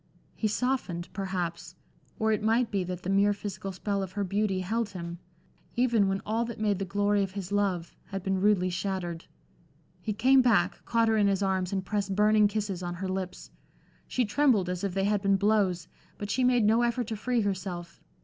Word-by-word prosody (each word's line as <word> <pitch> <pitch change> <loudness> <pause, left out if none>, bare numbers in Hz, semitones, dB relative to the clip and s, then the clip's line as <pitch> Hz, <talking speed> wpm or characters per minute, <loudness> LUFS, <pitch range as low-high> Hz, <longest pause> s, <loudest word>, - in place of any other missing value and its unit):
He 220 - -1
softened, 210 -7 -1
perhaps, 175 -3 -4 0.4
or 220 0 +1
it 215 - +1
might 225 +3 +2
be 195 -3 0
that 180 0 -5
the 185 - -3
mere 200 +1 +4
physical 200 -1 -5
spell 200 +2 -2
of 190 -1 -5
her 205 - -1
beauty 195 0 0
held 220 +4 -1
him, 170 -3 -7 0.6
even 235 -5 +3
when 195 0 -1
all 225 +2 0
that 235 -2 -7
made 205 -3 +1
the 195 - -2
glory 205 +2 +1
of 195 -1 -2
his 195 -2 -5
love, 195 -4 0
had 195 -2 -6
been 190 -1 0
rudely 190 -3 +3
shattered. 180 -2 -3 0.8
He 220 - -2
came 260 +5 +5
back, 240 -4 +2
caught 230 -1 +2
her 220 0 +3
in 205 -1 +4
his 200 0 +1
arms, 190 -2 0
and 190 -1 -2
pressed 200 -1 -1
burning 210 +1 +5
kisses 205 -3 -3
on 175 -1 -4
her 190 +2 -4
lips. 185 -1 -5 0.6
She 250 - 0
trembled 215 -5 +2
as 180 +1 -3
if 195 -2 -2
they 195 - +1
had 205 -1 +1
been 195 -1 +3
blows, 195 -4 +1 0.3
but 205 0 -4
she 260 - +1
made 245 -3 +4
no 225 +3 +4
effort 240 0 0
to 220 0 -4
free 240 +2 0
herself. 185 -4 -4
200 Hz, 205 wpm, -28 LUFS, 185-215 Hz, 0.8 s, came